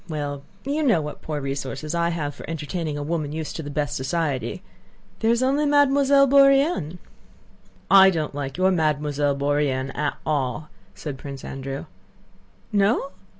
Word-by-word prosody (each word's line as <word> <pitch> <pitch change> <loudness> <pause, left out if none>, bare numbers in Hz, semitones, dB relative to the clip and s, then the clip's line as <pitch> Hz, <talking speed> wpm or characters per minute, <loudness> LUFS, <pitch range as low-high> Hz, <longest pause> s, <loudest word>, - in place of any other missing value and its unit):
well, 145 -2 -3 0.2
you 290 +3 -1
know 245 - +3
what 150 -1 -6
poor 150 -2 -4
resources 140 +2 -4
I 170 0 +1
have 155 -4 -3
for - - -11
entertaining 160 -1 -3
a 145 - -3
woman 155 -1 -2
used 155 0 -5
to - - -4
the 145 - -7
best 145 0 -2
society. 135 -3 -2 0.6
There 225 - +1
is 235 +2 +2
only 280 +3 +2
Mademoiselle 280 -1 +5
Bourienne...." 275 - +4 0.9
"I 195 0 +9
don't 160 -6 -2
like 140 0 -5
your 185 +1 +3
Mademoiselle 150 -4 +1
Bourienne 140 -2 0
at 150 0 -1
all," 150 0 -1 0.3
said 140 -4 -6
Prince 140 -2 -8
Andrew. 135 0 -5 0.9
"No? 210 +7 +2
155 Hz, 150 wpm, -24 LUFS, 145-195 Hz, 0.9 s, I